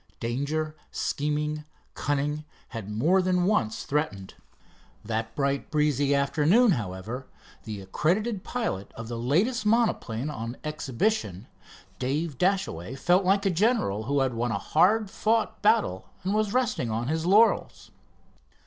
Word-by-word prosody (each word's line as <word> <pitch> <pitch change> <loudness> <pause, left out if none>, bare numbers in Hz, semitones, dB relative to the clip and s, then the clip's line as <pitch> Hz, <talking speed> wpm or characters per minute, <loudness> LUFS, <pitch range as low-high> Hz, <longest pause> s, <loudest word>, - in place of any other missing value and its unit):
Danger, 145 +6 -2
scheming, 150 +1 -2 0.3
cunning 145 +1 -1 0.3
had 115 -4 -6
more 155 - +3
than 180 -1 +1
once 130 - +1
threatened. 140 -11 -2 0.7
That 110 0 -3
bright, 140 -1 -1
breezy 145 -2 +2
afternoon, 160 - +4
however, 110 - -4 0.4
the 105 -3 -5
accredited 185 - 0
pilot 225 - -3
of 115 0 -7
the 120 -1 -4
latest 190 - +1
monoplane 210 - +1
on 115 -3 -5
exhibition, 145 - -1 0.5
Dave 140 +2 -2
Dashaway 180 - 0
felt 175 +7 +2
like 195 +2 +3
a 195 - +3
general 180 - +1
who 140 +2 +1
had 130 -2 +1
won 115 0 -1
a 100 - 0
hard 195 - +2
fought 220 -1 0
battle 205 - +2
and 190 +2 0
was 215 -1 +1
resting 240 - 0
on 115 +2 -2
his 160 +3 -1
laurels. 215 +5 +3
150 Hz, 130 wpm, -27 LUFS, 115-195 Hz, 0.7 s, afternoon